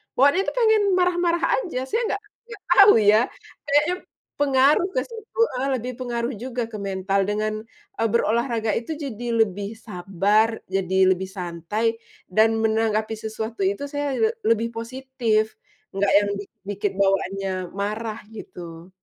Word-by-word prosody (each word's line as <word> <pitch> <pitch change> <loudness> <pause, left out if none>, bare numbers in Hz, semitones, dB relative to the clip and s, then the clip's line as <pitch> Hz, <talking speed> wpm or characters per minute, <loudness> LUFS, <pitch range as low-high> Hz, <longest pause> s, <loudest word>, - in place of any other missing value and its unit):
bawaannya 285 +8 +4
tuh - - -2
pengen 440 -3 +4
marah-marah 350 -1 +1 0.2
aja, 290 - -3
saya 450 - -1
nggak 405 - -7 0.2
nggak 435 -4 -11
tahu 400 +3 +8
ya. 210 +1 +6 0.5
Kayaknya 295 +5 +3 0.4
pengaruh 280 +5 +4
ke - - +2
situ, 455 0 -10 0.2
eee, 270 - 0
lebih 250 +1 -4
pengaruh 240 0 -2
juga 250 -2 -3
ke 215 - -5
mental 195 0 -1
dengan, 215 +1 -1 0.5
eee, 225 - +3
berolahraga 230 -1 +1
itu 235 - -8
jadi 250 -6 -6 0.2
lebih 200 +2 -5
sabar, 205 +1 +1 0.2
jadi 190 -1 -1 0.2
lebih 190 +1 -1
santai 190 +5 -2 0.3
dan 220 +3 +4
menanggapi 220 0 +1
sesuatu 220 -2 -3
itu 200 +8 -2
saya 285 -2 -2
le 445 - +3 0.2
lebih 230 +1 +2
positif, 230 -2 -1 0.4
nggak 195 0 +2
yang 205 0 -1
bi 205 - -6 0.2
bikin 205 0 -1
bawaannya 195 0 +1 0.3
marah 215 +2 -3 0.2
gitu. 170 -3 -10
225 Hz, 140 wpm, -23 LUFS, 200-270 Hz, 0.5 s, tahu